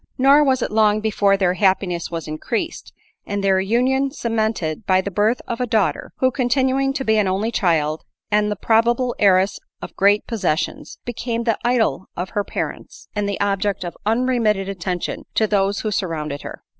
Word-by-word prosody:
Nor 275 +3 +6
was 265 -3 +2
it - - -3
long 215 -1 +3
before 205 -2 +2
their 185 -2 +2
happiness 185 -2 +1
was 165 -2 -5
increased, 225 - -4 0.3
and 200 -1 -3
their 190 -1 +3
union 255 +7 +1
cemented 220 - -2
by 185 -1 +4
the 200 +2 -3
birth 210 +6 +1
of 235 +1 -3
a 250 - 0
daughter; 205 -9 0
who 260 0 +2
continuing 265 +1 +1
to 270 -1 -3
be 220 0 +3
an 205 - +2
only 195 +5 0
child, 160 -7 +1 0.3
and 210 0 +2
the 210 - -1
probable 235 +4 +2
heiress 195 0 +3 0.2
of - - -9
great 200 +2 +3
possessions, 185 -9 -2
became 235 -1 -3
the 230 -2 0
idol 240 -5 +1
of 180 +2 -4
her 205 -2 -1
pa - - -3
rents, - - -8
and 205 -1 -1
the 200 - -3
object 200 -1 0
of 175 - -6
unremitted 225 -3 +1
attention 180 -2 -4
to 220 - +3
those 200 -1 +1
who 215 - -2
surrounded 155 -7 -3
her. - - -9
210 Hz, 180 wpm, -21 LUFS, 190-235 Hz, 0.3 s, Nor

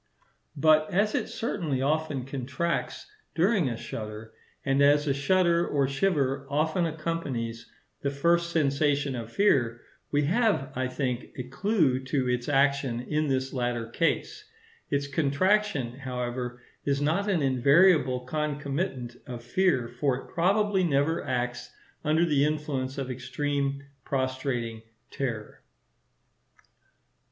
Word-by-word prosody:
But 155 +1 +4
as 205 +4 +2
it - - 0
certainly 165 - -2
often 145 -1 0
contracts 140 - -3 0.3
during 180 - +3
a 115 - -4
shudder; 110 0 -7 0.3
and 135 0 +2
as 145 +1 +5
a 140 - +2
shudder 170 +4 +2
or 140 -2 +1
shiver 140 -3 0
often 160 +4 +1
accompanies 145 -8 -4 0.3
the 140 - 0
first 170 +4 +2
sensation 145 -3 +1
of 115 -1 -6
fear, 120 - +2 0.3
we 145 0 +2
have, 200 - +1
I 130 0 0
think, 125 -1 -3
a 125 - -3
clue 140 - +1
to 130 -1 0
its 125 +2 -1
action 140 -3 +2
in 150 +4 -1
this 130 -1 -1
latter 120 -3 -2
case. 420 - -1 0.5
Its 140 0 0
contraction, 140 - +1
however, 125 -1 -4 0.2
is 140 -1 0
not 165 +8 +1
an 175 -7 +1
invariable 135 +1 +4
concomitant 140 -2 -3
of 120 -2 -7
fear; 130 -1 +1
for 125 +3 0
it 135 - -10
probably 195 +2 +2
never 150 0 +1
acts 125 -2 -2 0.3
under 160 +2 +3
the 145 -4 +2
influence 145 -3 -1
of 135 -2 -3
extreme, 140 +2 -2 0.2
prostrating 130 -4 -2 0.3
terror. 115 -6 -4
140 Hz, 125 wpm, -27 LUFS, 125-160 Hz, 0.5 s, as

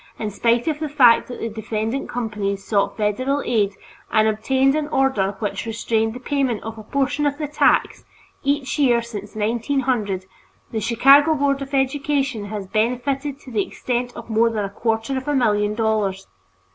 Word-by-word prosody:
In 215 -2 -3
spite 235 +5 +1
of 305 -2 0
the 310 -1 -3
fact 255 -5 +5
that 245 - -7
the - - -2
defendant 220 +3 -3
companies 210 -4 -3
sought 200 0 0
federal 255 +7 0
aid 205 -4 +1 0.4
and 215 0 +4
obtained 260 +5 +2
an 300 0 -1
order 265 -9 +1
which 210 +1 -3
restrained 225 0 -1
the - - -6
payment 260 -4 -1
of 225 0 -7
a - - -9
portion 280 +5 0
of 285 0 -2
the 300 -1 -3
tax, 295 - +2 0.4
each 280 +1 -1
year 240 -4 +3
since 210 -3 -8
1900, 225 -3 -1 0.5
the 225 - -2
Chicago 275 +8 +5
Board 280 -1 +1
of 275 0 -4
Education 270 -3 0
has 205 -1 -5
benefited 250 +7 -1
to 255 - -12
the 215 -3 +1
extent 245 +3 -3
of 235 - -9
more 230 +1 +3
than 215 -3 -2
a 195 - -6
quarter 225 +4 -1
of 260 - -13
a 295 - +1
million 210 -4 +2
dollars. 210 -4 0
235 Hz, 175 wpm, -21 LUFS, 215-275 Hz, 0.5 s, fact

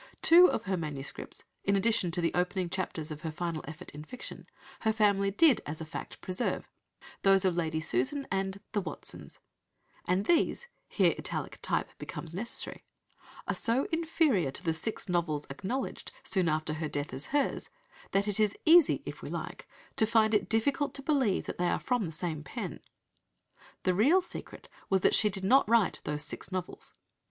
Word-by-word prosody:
Two 355 +2 +8
of 225 - -1
her 190 -1 -1
MSS. 150 -4 -5 0.2
(in 200 - +2
addition 200 -2 +2
to 175 +1 -1
the 165 - +1
opening 180 0 0
chapters 160 -4 -3
of 150 0 -6
her 160 - -3
final 165 -1 -3
effort 155 -1 -8
in 150 +1 -8
fiction) 250 +10 -8 0.3
her 220 - +2
family 200 -2 +3
did, 275 +6 +4
as 150 +1 -5
a 160 - -5
fact, 155 - -7
preserve, 185 0 -2 0.5
those 195 -1 +5
of 180 -2 +2
Lady 160 -2 0
Susan 160 - 0
and 195 0 -1
The 205 - 0
Watsons, 175 - -8 0.7
and 185 +3 +1
these 345 +7 +2 0.2
(here - - +3
italic - - -4
type - - -1
becomes 165 -1 -5
necessary) 215 +7 -3 0.6
are - - +1
so 240 +4 +1
inferior 320 - +2
to 135 - -3
the 165 - +1
six 210 +7 -3
novels 165 -5 0
acknowledged, 220 +7 -4
soon 185 -4 +1
after 155 0 0
her 155 0 -3
death, 145 -2 -3
as 135 +3 -4
hers, 285 -1 0 0.4
that 195 +1 +1
it 205 +1 +2
is 210 -2 +2
easy 335 -1 +6
(if - - -7
we - - -6
like) - - -6 0.3
to 220 - +4
find 220 -1 +3
it 210 - +2
difficult 270 +6 +1
to 275 - -4
believe 265 -9 +1
that - - -6
they 180 - +2
are - - +1
from 245 -7 0
the - - -6
same 160 -1 -4
pen! - - -5 1.0
The 185 - +2
real 290 - +4
secret - - -8 0.2
was 190 -1 +3
that - - +4
she 210 - +5
did 195 -1 -4
not 250 +3 +4
write 230 -4 +3
those 150 0 -1
six 155 - -4
novels. 185 -1 -5
190 Hz, 180 wpm, -30 LUFS, 160-225 Hz, 1.0 s, Two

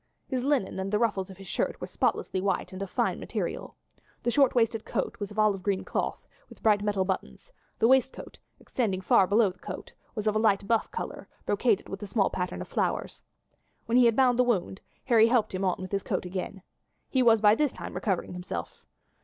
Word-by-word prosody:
His 255 -2 -2
linen 265 -9 0
and 190 +1 -3
the 210 - +3
ruffles 200 -4 0
of 190 - -11
his 195 - -11
shirt - - -2
were - - -4
spotlessly 185 - -1
white 195 -1 -1
and 185 - -7
of 195 - -4
fine - - 0
material. - - -4 0.5
The 240 - +1
short 275 -1 +3
waisted 225 -2 +2
coat - - -3
was 205 -2 -4
of 210 - -12
olive 210 -3 +3
green 195 0 -1
cloth, - - -3 0.2
with - - -16
bright 210 -2 +4
metal 205 -2 0
buttons; 190 - -4 0.3
the 225 - +4
waistcoat, 265 0 +1 0.2
extending 200 -7 -2
far 185 0 +4
below 205 -1 +3
the 180 - -21
coat, - - -8 0.2
was 215 -2 -3
a 215 - +3
light 210 -2 +2
buff 225 0 +1
colour, 455 - -6 0.2
brocaded 205 0 +1
with 195 +1 -7
a 205 - -5
small 200 0 +1
pattern 180 -1 -3
of - - -13
flowers. - - -2 0.6
When 230 - 0
he 250 -1 +7
had 230 -2 +4
bound 250 -1 +3
the - - +7
wound 205 -5 -1 0.2
Harry 230 -3 +5
helped 235 -4 +2
him 185 +1 -2
on 185 -2 +1
with 185 0 -7
his 200 -1 0
coat - - -2
again. 185 +1 -5 0.4
He 260 - +1
was 230 -2 +5
by 210 0 +6
this 290 +3 +1
time - - -8
recovering 190 -3 -2
himself. 175 - -6
210 Hz, 210 wpm, -28 LUFS, 190-235 Hz, 0.6 s, he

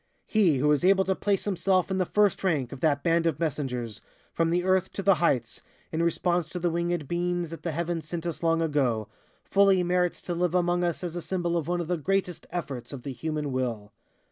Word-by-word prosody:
"He 190 -10 +3
who 140 +3 +1
was 150 +2 +3
able 190 +1 +4
to 190 - +2
place 200 0 0
himself 190 -1 +1
in 190 - 0
the 185 - +1
first 205 -2 +2
rank 150 -10 0
of 135 - -7
that 145 -2 +1
band 170 0 +2
of 165 - -1
messengers 125 -8 -3 0.3
from 165 0 +1
the 175 +1 +1
earth 185 0 +2
to 195 - -4
the 195 - +6
heights, 125 -9 +1 0.3
in 160 - -1
response 170 0 +1
to 180 - -6
the 175 0 0
wingèd 170 -2 -1
beings 175 0 -1
that 165 - -7
the 175 - -3
heavens 165 0 -3
sent 170 +1 -4
us 170 -3 -4
long 165 0 +2
ago, 125 -9 0 0.3
fully 195 -2 +4
merits 180 0 +1
to 175 - -3
live 175 0 0
among 175 0 +2
us 175 0 -1
as 175 -1 -4
a 175 - -3
symbol 175 -1 -1
of 165 -3 -1
one 175 0 0
of 170 - -5
the 180 0 0
greatest 185 +2 -1
efforts 140 -9 -5
of 135 -4 -8
the 140 - -5
human 150 0 -3
will. 115 -5 -3
170 Hz, 225 wpm, -27 LUFS, 150-180 Hz, 0.3 s, the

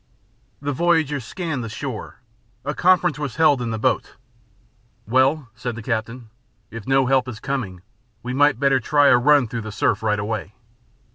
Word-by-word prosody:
The 145 - -1
voyagers 155 -4 +1
scanned 160 -7 -4
the 115 - -5
shore. 125 0 -7 0.4
A 145 - -1
conference 175 -5 +2
was 145 -5 -4
held 150 -5 +4
in 120 - -2
the 110 - -2
boat. 115 +2 -1 0.9
"Well," 130 +3 +2
said 120 +1 -5
the 115 - -8
captain, 115 0 -4 0.4
"if 115 -2 -8
no 135 0 +3
help 130 0 +2
is 115 -4 -7
coming 110 -11 -4 0.4
we 125 +1 -4
might 145 -1 +3
better 135 -1 +3
try 145 +3 +3
a - - +6
run 145 0 +4
through 115 +1 -4
the 110 0 -7
surf - - 0
right 105 -1 +1
away. 105 -1 -4
130 Hz, 170 wpm, -22 LUFS, 115-145 Hz, 0.9 s, a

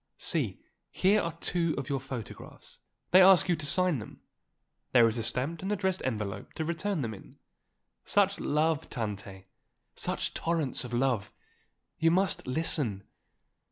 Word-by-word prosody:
See, - - -1 0.3
here 200 +3 +3
are 170 - -3
two 165 -1 0
of 135 -2 -4
your 140 -1 -1
photographs, 130 -4 -9 0.3
they 185 - +8
ask 190 -1 +7
you 175 - +3
to 155 -2 -4
sign 175 -2 +2
them. 105 - -10 0.7
There 120 -2 +7
is 115 +1 -1
a - - -2
stamped 140 +8 -2
and 190 +2 -3
addressed 190 -2 0
envelope 105 -6 -4
to 160 - -3
return 170 +2 -1
them 110 -2 -3
in. 100 - -14 0.7
Such 200 -1 +2
love, 155 +1 0
Tante! 100 -4 -5 0.5
such - - -2
torrents 165 -7 -1
of 125 - -8
love! 120 -4 0 0.7
You 165 0 +4
must 185 -2 +1
listen." 130 -7 0
155 Hz, 150 wpm, -29 LUFS, 120-175 Hz, 0.7 s, they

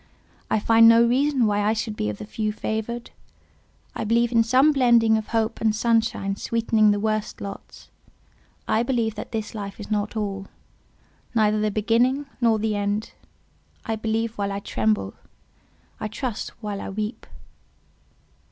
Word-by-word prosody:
I - - +2
find 225 +2 +6
no 230 +1 +6
reason 265 +1 +2
why 205 -1 +1
I 210 +1 +2
should 220 -1 -3
be 105 - -2
of 105 - -5
the 105 - -7
few 215 - -2
favoured. 220 +2 -4 0.8
I - - -4
believe 235 +2 +2
in 230 -1 +4
some 260 +6 +4
blending 235 -5 +4
of 220 -1 -2
hope 225 0 -1
and 220 -1 +2
sunshine 220 -3 0
sweetening 225 -2 +2
the 205 0 +2
worst 215 0 -2
lots. 200 0 -9 0.8
I 220 - +2
believe 235 -3 0
that - - -8
this 220 -1 -4
life 200 -2 -6
is 210 - -8
not 210 +1 -1
all; 195 -2 -3 0.9
neither 215 -1 +3
the 215 - +1
beginning 235 +7 +1 0.2
nor 230 -2 +4
the 215 0 -1
end. 205 +2 -2 0.7
I 225 - -1
believe 225 +1 -2
while 200 0 -1
I 195 - -3
tremble; 105 - -1 0.9
I 215 - -3
trust 230 +1 -4
while 205 -1 -4
I - - -6
weep." 210 +3 -5
220 Hz, 160 wpm, -24 LUFS, 210-230 Hz, 0.9 s, find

